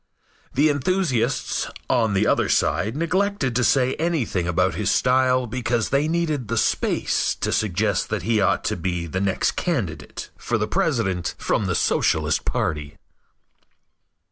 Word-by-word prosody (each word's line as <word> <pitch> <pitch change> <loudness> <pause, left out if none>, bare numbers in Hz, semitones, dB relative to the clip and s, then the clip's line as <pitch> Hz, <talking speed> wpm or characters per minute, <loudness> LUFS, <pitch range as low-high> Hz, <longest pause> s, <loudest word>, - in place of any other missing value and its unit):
The 150 +4 +4
enthusiasts 145 -5 0 0.2
on 110 -4 +1
the 95 - +2
other - - +2
side 110 +8 +1
neglected 180 - 0
to 125 - +2
say 130 +1 +3
anything 140 - -1
about 90 - +1
his - - -1
style 130 0 +3
because 120 -1 -1
they 140 +2 +1
needed 155 -7 -1
the 115 +2 -2
space - - +1
to - - -2
suggest 105 -1 0
that 105 -5 -2
he 110 +1 +1
ought - - +2
to - - -1
be 85 -1 -3
the 90 +3 -3
next 100 -1 +1
candidate 115 - -3
for 120 - -1
president 115 - -1
from 105 - 0
the 90 - 0
Socialist - - +1
party. 75 -2 -2
120 Hz, 140 wpm, -23 LUFS, 100-145 Hz, 0.2 s, The